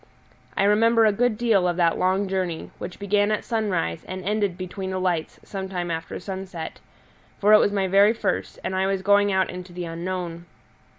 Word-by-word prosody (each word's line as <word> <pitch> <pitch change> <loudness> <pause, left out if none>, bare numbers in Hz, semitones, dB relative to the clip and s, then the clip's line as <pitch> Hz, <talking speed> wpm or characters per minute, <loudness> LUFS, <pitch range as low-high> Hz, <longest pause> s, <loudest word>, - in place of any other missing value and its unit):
I - - +3
remember 225 +3 +4
a 215 - +5
good 230 +1 +1
deal 215 -6 +3
of 175 -1 -1
that 170 -2 +3
long 190 +2 +1
journey, 185 -3 -3
which 180 - -7
began 205 +1 +1
at 215 - -1
sunrise 200 - -1
and 185 -1 -6
ended 205 -3 0
between 190 +1 -5
the 185 - -2
lights 175 -4 -1
some 190 -1 -6
time 175 -2 -3
after 165 0 -4
sunset; 190 -4 -6 0.6
for 210 +1 +4
it 215 - +9
was - - +3
my 195 -2 0
very 200 +3 +5
first, - - -2
and 190 - -2
I 190 +1 +1
was 195 -1 -1
going 205 0 +4
out 190 -1 +1
into 180 0 -9
the 175 0 -5
unknown. 170 0 -5
190 Hz, 195 wpm, -24 LUFS, 180-205 Hz, 0.6 s, it